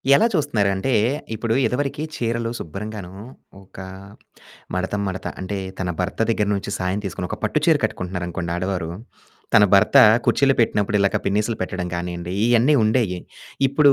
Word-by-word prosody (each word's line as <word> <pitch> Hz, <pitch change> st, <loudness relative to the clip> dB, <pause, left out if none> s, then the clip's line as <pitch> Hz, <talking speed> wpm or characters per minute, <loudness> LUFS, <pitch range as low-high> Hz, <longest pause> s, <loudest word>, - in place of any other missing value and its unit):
ఎలా 225 Hz, -, +4 dB
చూస్తున్నారు 140 Hz, -, +1 dB
అంటే, 95 Hz, +8 st, -1 dB, 0.4 s
ఇప్పుడు 115 Hz, +1 st, -1 dB
ఇదివరకి 140 Hz, +4 st, -1 dB
చీరలు 115 Hz, -1 st, -1 dB
శుభ్రంగాను, 100 Hz, +1 st, -7 dB, 0.5 s
ఒక 95 Hz, -, -19 dB, 1.0 s
మడత, 95 Hz, +2 st, -2 dB
మడత 95 Hz, 0 st, -4 dB
అంటే, 100 Hz, +2 st, -4 dB, 0.2 s
తన 90 Hz, -2 st, -2 dB
భర్త 90 Hz, +2 st, -3 dB
దగ్గర 105 Hz, -2 st, +1 dB
నుంచి 100 Hz, +1 st, -4 dB
సహాయం 95 Hz, +2 st, -1 dB
తీసుకొని, 90 Hz, -1 st, -4 dB
ఒక -, -, -3 dB
పట్టు -, -, +1 dB
చీర -, -, +6 dB
కట్టుకుంటున్నారు 90 Hz, 0 st, -3 dB
అనుకోండి 85 Hz, 0 st, -4 dB
ఆడవారు, 90 Hz, -2 st, -2 dB, 0.6 s
తన 105 Hz, -, +8 dB
భర్త 100 Hz, -, +4 dB, 0.3 s
కుచ్చిళ్ళు 135 Hz, -1 st, +3 dB
పెట్టినప్పుడు 105 Hz, -2 st, +1 dB
ఇలాక 100 Hz, 0 st, +2 dB
పిన్నీసులు 105 Hz, +3 st, 0 dB
పెట్టడం 90 Hz, -1 st, -3 dB
గానియాండి, 85 Hz, +1 st, -4 dB
ఇయన్ని 120 Hz, +5 st, +4 dB
ఉండేయి. 110 Hz, -5 st, +1 dB, 0.5 s
ఇప్పుడు 140 Hz, 0 st, +5 dB
100 Hz, 145 wpm, -22 LUFS, 90-115 Hz, 1.0 s, తన